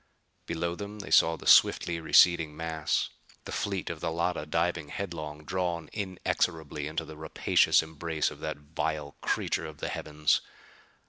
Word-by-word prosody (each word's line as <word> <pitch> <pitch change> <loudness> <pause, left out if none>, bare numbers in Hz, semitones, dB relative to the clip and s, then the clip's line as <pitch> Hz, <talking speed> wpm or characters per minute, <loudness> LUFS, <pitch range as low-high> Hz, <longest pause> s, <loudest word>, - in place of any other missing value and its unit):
Below 85 +1 -2
them 100 +2 -7
they 100 - -8
saw 80 0 +5
the - - -12
swiftly 85 -1 +5
receding 80 -1 +4
mass: 80 -2 -1 0.4
the - - -7
fleet 100 -3 -2
of 80 - -7
the 80 - -2
Llotta 85 -1 -1
diving 85 -1 0
headlong, 80 -6 -5
drawn 85 -3 -2
inexorably 85 -6 -2
into 80 +1 -3
the 80 - -10
rapacious 80 +1 +3
embrace 80 0 -2
of - - -11
the 80 0 -3
vile 75 0 -4
creature 80 - -1
of 75 -1 -10
the - - -4
heavens. 75 0 +1
80 Hz, 150 wpm, -29 LUFS, 75-85 Hz, 0.4 s, saw